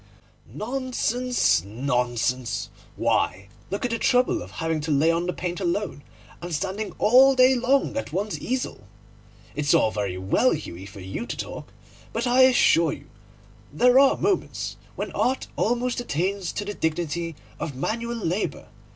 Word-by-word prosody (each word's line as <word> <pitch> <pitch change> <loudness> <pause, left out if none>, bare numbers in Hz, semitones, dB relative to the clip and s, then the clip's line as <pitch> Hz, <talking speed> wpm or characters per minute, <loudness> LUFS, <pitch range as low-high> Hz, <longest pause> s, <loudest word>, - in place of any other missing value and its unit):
'Nonsense, 250 - 0
nonsense! 125 +2 -1 0.2
Why, 100 +2 0 0.2
look 200 +5 -2
at 245 - -1
the 230 - -1
trouble 265 +10 +2
of - - -9
laying 160 -1 +1
on 170 +1 -1
the - - +1
paint 180 0 -4
alone, 190 -3 -2 0.4
and 175 0 -6
standing 195 +6 -3
all 265 +4 +6
day 255 0 +6
long 260 +3 +1
at 280 - -3
one's 200 +5 -2
easel! 255 +1 -3 0.7
It's 145 -1 +2
all 110 - +3
very 100 -4 -3
well, 95 +1 +2
Hughie, 90 +3 -8
for 95 0 -11
you 95 +1 -5
to - - -5
talk, - - -7 0.4
but 230 +2 -1
I 250 +1 +4
assure 170 - +4
you 140 - -12 0.6
that - - -13
there 250 +1 +7
are 275 -1 +5
moments 395 -2 -1 0.2
when - - -4
Art 260 +1 0
almost 245 +2 0
attains 190 -3 -2
to 205 - -3
the 205 - -4
dignity 165 -1 -2 0.2
of 145 - -4
manual 235 - -2
labour. 190 -1 -2
190 Hz, 150 wpm, -25 LUFS, -, 0.7 s, there